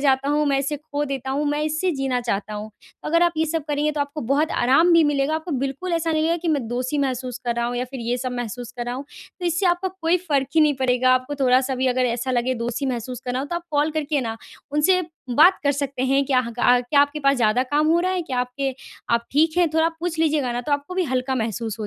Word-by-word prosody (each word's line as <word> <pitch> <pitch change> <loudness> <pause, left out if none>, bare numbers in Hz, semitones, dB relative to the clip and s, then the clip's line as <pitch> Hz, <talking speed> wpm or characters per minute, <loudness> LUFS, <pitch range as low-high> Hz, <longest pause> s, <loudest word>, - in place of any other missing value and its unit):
जाता 270 -1 +2
हूँ, 300 +1 +2
मैं 275 -1 +2
इसे 280 +2 -1
खो 290 0 -4
देता 265 -2 -4
हूँ, 285 +3 0
मैं 295 +1 -1
इसे 310 +4 0
जीना 260 -2 0
चाहता 210 -3 -3
हूँ। 210 +1 -6 0.3
अगर 335 +2 +2
आप 345 -1 +3
ये 320 - +1
सब 320 -1 -2
करेंगे, 295 +1 0
तो 295 - -3
आपको 285 +2 -3
बहुत 305 +2 +1
आराम 275 +8 +4
भी 335 -1 +6
मिलेगा। 280 +2 0
आपको 320 +2 -4
बिल्कुल 275 +7 -4
ऐसा 330 -1 0
नहीं 310 0 +1
है 335 +1 +1
कि 340 0 -3
मैं 285 -7 0
दोषी 255 +4 -2
महसूस 255 -2 -2
कर 240 - +1
रहा 235 0 0
हूँ 245 0 -3
या 245 - -1
फिर 260 - -4
ये 235 +1 -1
सब 255 0 -3
महसूस 245 0 -5
कर 245 -1 -5
रहा 245 - -3
हूँ। 265 +3 -6 0.4
तो 355 - -1
इससे 345 +3 +1
आपको 355 +2 +1
कोई 360 -2 0
फ़र्क 325 -5 0 0.2
ही 320 - +5
नहीं 300 -2 +4
पड़ेगा, 255 -1 +2
आपको 255 +3 -2
थोड़ा-सा 260 0 +3
भी 260 +1 0
अगर 255 0 +1
ऐसा 240 +2 -2
लगे, 250 0 +1
दोषी 240 +3 -3
महसूस 250 0 -4
करना 250 0 -2
हो, - - -3
तो 345 - -4
आप 345 - -5
कॉल 295 +1 +2
करके 300 -2 -1
ना, 225 -1 -4 0.4
उनसे 330 +5 +3 0.3
बात 310 +10 +6
कर 285 - +3
सकते 275 -2 -3
हैं, 275 +1 +2
"क्या 260 -2 +3
ह 235 -2 -5
का 245 +1 +5
क्या 265 +4 +2
आपके 285 +1 +1
पास 275 -1 +3
ज़्यादा 230 +1 +2
काम 305 +1 +3
हो 335 +2 +4
रहा 370 +1 0
है? 365 - -1
क्या 260 -6 -3
आपके 260 +2 -3 0.4
आप 235 0 -1
ठीक 315 +4 +2
हैं?" 350 -2 +4
थोड़ा 320 - +3
आप 330 - -3
पूछ 340 -1 -3
लीजिएगा 300 -6 +1
ना, 240 - -2
तो 265 +4 -3
आपको 285 +5 -2
भी 370 -1 +1
हल्का 255 +1 0
महसूस 225 -2 -3
हो 210 - -3
275 Hz, 270 wpm, -22 LUFS, 250-310 Hz, 0.4 s, भी